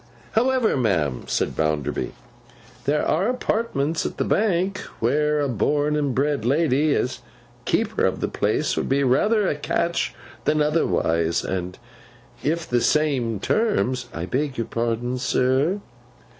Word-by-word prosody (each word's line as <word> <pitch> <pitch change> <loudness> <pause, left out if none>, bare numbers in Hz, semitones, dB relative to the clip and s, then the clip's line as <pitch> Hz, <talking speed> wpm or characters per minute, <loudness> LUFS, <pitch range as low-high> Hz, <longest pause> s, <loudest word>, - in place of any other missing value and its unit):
'However, 255 0 +2
ma'am,' 85 - 0
said - - -1
Bounderby, 75 -3 -1 0.7
'there 145 +2 +1
are 185 +8 +2
apartments 210 - -1
at - - -4
the - - +1
Bank, 195 -2 +1 0.2
where 150 +5 +2
a 145 - +1
born 145 +5 +1
and 145 -4 0
bred 140 -2 +1
lady, 145 +2 +2
as 125 - -1 0.5
keeper - - 0
of - - -2
the - - -1
place, - - 0
would - - -2
be 140 +1 +2
rather 205 - +3
a - - +1
catch 170 +3 -1 0.3
than 155 0 +2
otherwise; 85 - +1
and 90 -1 -3 0.6
if 165 +3 -1
the 120 -1 +1
same 130 -9 +1
terms—' 130 - 0
'I 85 +1 -4
beg 135 +5 -2
your 115 - -1
pardon, 120 +2 -2
sir. 130 +9 +1
140 Hz, 140 wpm, -23 LUFS, 120-160 Hz, 0.7 s, rather